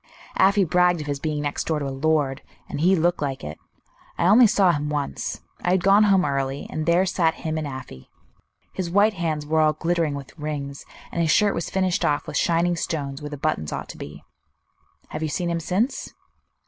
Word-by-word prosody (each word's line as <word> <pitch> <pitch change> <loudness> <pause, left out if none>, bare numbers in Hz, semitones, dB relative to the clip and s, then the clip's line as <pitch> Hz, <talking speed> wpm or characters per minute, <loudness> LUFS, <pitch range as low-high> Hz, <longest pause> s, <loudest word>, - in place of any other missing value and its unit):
"Afy 200 +1 +4
bragged 180 0 +3
of - - -6
his 145 -1 -3
being 150 -1 -2
next 145 0 -3
door 160 - +1
to 145 - -3
a - - -2
lord; 140 -1 0 0.3
and - - -4
he 185 +3 +5
looked 175 0 +1
like 135 -2 -3
it. 75 +1 -7 0.6
I - - +1
only 220 +6 +7
saw 195 -3 +4
him 150 -2 -2
once; 145 - -3 0.2
I - - +1
had 180 -1 +2
gone 200 +2 +6
home 195 -3 +4
early, 135 -1 -2
and 155 0 -3
there 175 +3 +4
sat 170 -3 +1
him 160 0 -1
and 155 -2 -2
Afy. 130 - -9 0.6
His 185 -3 -3
white 205 +4 +4
hands 160 -5 -2
were 160 +1 +1
all 155 -1 +4
glittering 165 -1 0
with 140 +3 -9
rings, 140 -2 -5 0.3
and 170 - -1
his 165 - +1
shirt 205 +5 +4
was 170 - -3
finished 185 -2 0
off 145 0 +1
with - - -7
shining 170 +1 +2
stones 140 -4 -3
where 150 - -5
the 145 - -6
buttons 135 - -1
ought - - -5
to - - -9
be." 75 0 -9 0.9
"Have 155 - -5
you 155 - -1
seen 175 +3 -2
him 170 - -1
since?" 190 - -1
160 Hz, 210 wpm, -24 LUFS, 145-180 Hz, 0.9 s, only